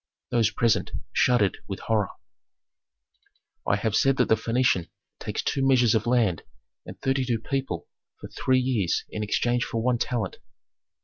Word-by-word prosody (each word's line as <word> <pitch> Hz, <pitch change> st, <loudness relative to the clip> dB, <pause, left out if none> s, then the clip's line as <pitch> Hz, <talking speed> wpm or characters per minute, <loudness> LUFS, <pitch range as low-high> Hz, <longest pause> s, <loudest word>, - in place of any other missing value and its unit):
Those 115 Hz, -3 st, +3 dB
present 115 Hz, +1 st, +1 dB, 0.2 s
shuddered 110 Hz, -6 st, +2 dB
with 95 Hz, -1 st, -6 dB
horror. 105 Hz, -4 st, 0 dB, 1.6 s
"I -, -, +3 dB
have 105 Hz, +1 st, -1 dB
said 135 Hz, +3 st, +3 dB
that 125 Hz, -, +2 dB
the -, -, +6 dB
Phœnician 115 Hz, -5 st, +1 dB, 0.3 s
takes -, -, -4 dB
two 135 Hz, -, -1 dB
measures 125 Hz, -4 st, +4 dB
of 110 Hz, 0 st, 0 dB
land 115 Hz, -9 st, +2 dB, 0.5 s
and -, -, -9 dB
thirty 135 Hz, 0 st, +1 dB
two 120 Hz, -2 st, 0 dB
people 135 Hz, +4 st, -3 dB, 0.3 s
for -, -, -8 dB
three 130 Hz, 0 st, +1 dB
years 120 Hz, -9 st, 0 dB
in 110 Hz, -, -4 dB
exchange 120 Hz, +3 st, 0 dB
for 115 Hz, -, -3 dB
one 125 Hz, -1 st, +1 dB
talent. 115 Hz, -7 st, -2 dB
120 Hz, 150 wpm, -26 LUFS, 105-125 Hz, 1.6 s, the